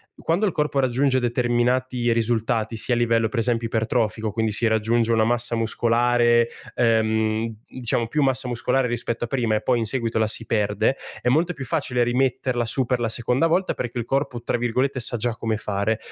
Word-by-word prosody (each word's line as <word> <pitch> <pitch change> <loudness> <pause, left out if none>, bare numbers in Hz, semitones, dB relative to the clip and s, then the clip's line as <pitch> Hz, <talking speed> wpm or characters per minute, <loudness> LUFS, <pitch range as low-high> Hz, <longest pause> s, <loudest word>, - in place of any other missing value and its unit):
quando 175 +6 0
il 200 - +1
corpo 150 -2 -1
raggiunge 130 0 +2
determinati 120 0 0
risultati, 115 0 0
sia 115 +3 -2
a - - +1
livello 115 -1 +2
per 115 - -2
esempio 115 0 +1
ipertrofico, 110 -1 -1
quindi 110 +1 -1
si 115 +3 +2
raggiunge 115 +1 +1
una 110 -1 +3
massa 120 +1 0
muscolare, 120 +1 +2 0.3
ehm, 110 -1 +1 0.2
diciamo 120 -2 -2
più 150 +6 -1
massa 130 -1 0
muscolare 125 +2 0
rispetto 120 0 -3
a - - -1
prima 115 -4 0
e 105 - -1
poi 125 -2 +2
in 115 - -1
seguito 115 -1 -1
la 110 - +2
si 110 +1 0
perde, 105 +3 0 0.2
è - - 0
molto 165 +7 +2
più 135 -5 -7
facile 130 -5 0
rimetterla 125 0 0
su 125 +3 -1
per 125 +1 0
la 115 -1 -1
seconda 125 +7 0
volta 185 +3 +1
perché 120 0 -5
il 120 - -2
corpo, 135 -2 -2
tra 120 - -1
virgolette, 130 +3 0
"sa 120 0 -1
già 115 +1 -1
come 110 -1 -2
fare" 105 +1 -1
120 Hz, 195 wpm, -23 LUFS, 115-125 Hz, 0.3 s, una